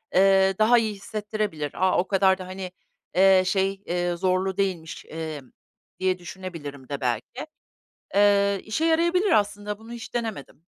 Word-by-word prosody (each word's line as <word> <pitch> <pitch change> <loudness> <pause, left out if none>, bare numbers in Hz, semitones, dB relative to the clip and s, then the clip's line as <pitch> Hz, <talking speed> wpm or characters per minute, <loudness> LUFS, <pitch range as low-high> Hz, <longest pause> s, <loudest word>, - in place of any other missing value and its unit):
eee, 195 0 +5
daha 225 +3 +6
iyi 220 -2 +1
hissettirebilir. 205 -7 -4
A! 185 0 +2
O 180 - +1
kadar 190 -1 +3
da, 185 - -7
eee, 190 -1 -6 0.4
hani, 190 0 +6
şey, 195 +1 0
eee, 175 0 -1
zorlu 185 +1 0
değilmiş, 180 -5 -2
eee, 160 -2 -6 0.6
diye 185 -1 +1
düşünebilirim 165 -7 -8
de 140 -1 -4
belki. 125 - -3 0.7
Eee, 200 -1 +4
işe 265 +10 -1
yarayabilir 340 +4 +2
aslında, 205 -3 0
bunu 225 +1 -12
hiç 240 +1 -8
denemedim. 220 - -5
190 Hz, 145 wpm, -25 LUFS, 180-210 Hz, 0.7 s, daha